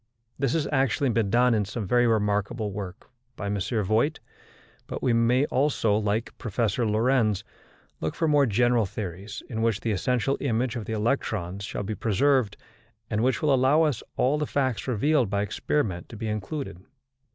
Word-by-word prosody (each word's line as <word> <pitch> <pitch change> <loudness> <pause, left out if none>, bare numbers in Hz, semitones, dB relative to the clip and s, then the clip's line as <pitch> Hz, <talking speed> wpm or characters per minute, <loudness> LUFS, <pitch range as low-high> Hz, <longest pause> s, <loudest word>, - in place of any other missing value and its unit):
This 135 -3 +1
has 155 -3 0
actually 135 -1 +2
been 115 -3 +1
done 125 +3 +4
in 105 -2 +2
some 105 +2 -4
very 120 +5 +3
remarkable 105 0 0
work 95 -2 -7 0.3
by 100 - -6
M. 100 0 -1
Voigt, 110 +8 0 0.7
but - - -6
we 125 - +3
may 120 +4 +3
also, 130 -7 +1
like 110 +2 -1
Professor 115 0 0
Lorentz, 110 -1 +2 0.6
look 80 - -3
for 165 - 0
more 145 -3 +4
general 120 0 +2
theories, 95 0 -6
in 110 -2 -4
which 115 -3 +1
the 115 - -1
essential 125 +6 0
image 120 -2 0
of 115 -3 -4
the 110 - -4
electrons 105 -4 -1
shall 100 - -4
be 105 +2 -3
preserved, 115 +1 +1 0.5
and 110 0 +1
which 130 +5 +1
will 150 -2 +4
allow 145 +4 +4 0.3
all 140 +4 +2
the 150 - -1
facts 130 -5 -1
revealed 130 0 +2
by 100 0 0
experiment 100 -2 -2
to 115 - -9
be 110 - -4
included. 105 - -4
115 Hz, 170 wpm, -26 LUFS, 105-130 Hz, 0.7 s, done